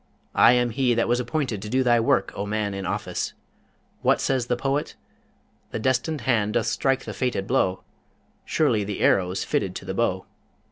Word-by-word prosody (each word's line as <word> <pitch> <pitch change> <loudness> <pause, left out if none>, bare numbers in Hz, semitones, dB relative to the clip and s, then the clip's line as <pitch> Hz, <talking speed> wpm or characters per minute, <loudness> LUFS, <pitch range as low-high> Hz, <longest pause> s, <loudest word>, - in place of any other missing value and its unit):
I 120 - +6
am 120 -1 +2
he 125 0 +1
that 115 - +1
was 120 +1 +2
appointed 125 -4 -2
to 105 - -6
do 130 +3 +2
thy 120 -2 +4
work, 115 -4 +2
O 100 - -3
man 105 -1 -1
in 95 -1 -4
office! - - -3 0.7
What - - +3
says 130 -3 0
the 125 - +1
poet? 135 +3 -2 0.7
"The - - -4
destined 130 +5 0
hand 110 -4 +1
doth 120 -1 +1
strike 135 +4 0
the - - -5
fated 125 -7 -1
blow: 95 -1 0 0.6
Surely 120 -9 +1
the 100 -1 -4
arrow's 90 0 +2
fitted - - -1
to - - -7
the - - -4
bow!" - - 0
120 Hz, 185 wpm, -24 LUFS, 105-130 Hz, 0.7 s, I